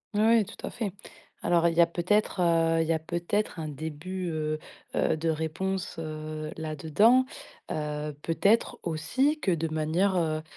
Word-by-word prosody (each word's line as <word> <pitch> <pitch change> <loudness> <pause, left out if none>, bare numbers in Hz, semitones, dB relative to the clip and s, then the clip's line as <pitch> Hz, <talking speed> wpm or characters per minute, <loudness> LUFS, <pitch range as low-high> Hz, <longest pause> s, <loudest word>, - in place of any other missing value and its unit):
Ouais, 210 - +3
ouais 225 0 +5
tout - - -12
à - - -3
fait. 220 -5 -3 0.5
Alors, 170 -1 +3
il 165 - 0
y 170 - +6
a 170 - +6
peut-être, 185 +4 +1
heu, 165 -1 +3
il 160 - -1
y 165 - +3
a 160 - 0
peut-être 175 +4 -2
un 155 - -3
début, 160 +5 -5
heu 155 -1 -2 0.4
heu, 160 - +2
de 165 - -2
réponse, 165 +4 -2
heu, 155 -1 -5
là-dedans. 160 - +3 0.5
Heu, 150 0 -3
peut-être 200 +7 +2
aussi 260 - +1
que 205 - -1
de 165 -1 0
manière, 160 +5 +1
heu 155 -3 +1
165 Hz, 170 wpm, -28 LUFS, 155-190 Hz, 0.5 s, y